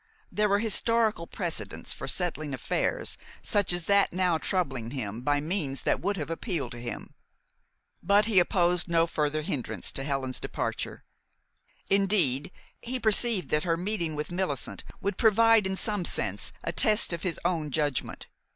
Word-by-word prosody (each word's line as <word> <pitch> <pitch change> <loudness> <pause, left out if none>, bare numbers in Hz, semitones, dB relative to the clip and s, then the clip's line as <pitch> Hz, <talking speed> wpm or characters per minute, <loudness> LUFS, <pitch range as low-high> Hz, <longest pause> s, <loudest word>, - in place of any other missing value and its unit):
There 210 0 +1
were 200 - +4
historical 220 -3 +2
precedents - - -3
for - - -7
settling 155 -6 -2
affairs 125 - -1 0.2
such 205 -3 +2
as 175 -1 +1
that 200 +2 +3
now 180 -2 +1
troubling 135 - -1
him 120 -4 -4
by 145 +3 +1
means 150 -3 -2
that - - +1
would 200 +2 -1
have 155 -1 -4
appealed 160 -5 -3
to 120 - -8
him. 120 - -6 0.9
But 200 +4 +4
he 210 -4 +4
opposed 175 0 +2
no 165 -1 +3
further 155 -2 -1
hindrance 120 - -2
to 135 - -2
Helen's 135 -2 -1
departure. - - -4 0.8
Indeed, 185 -9 +2 0.3
he 255 +2 -3
perceived 220 -2 +3
that 150 - +1
her 165 -2 0
meeting 175 -4 -2
with 150 +3 -4
Millicent 175 -7 -3 0.2
would 200 - -2
provide 225 -2 +5
in 190 - -2
some 205 -1 +1
sense - - 0
a - - -2
test 215 -4 +3
of 170 - -4
his 180 -3 -2
own 160 -4 0
judgment. 145 -2 -2
175 Hz, 160 wpm, -28 LUFS, 145-200 Hz, 0.9 s, provide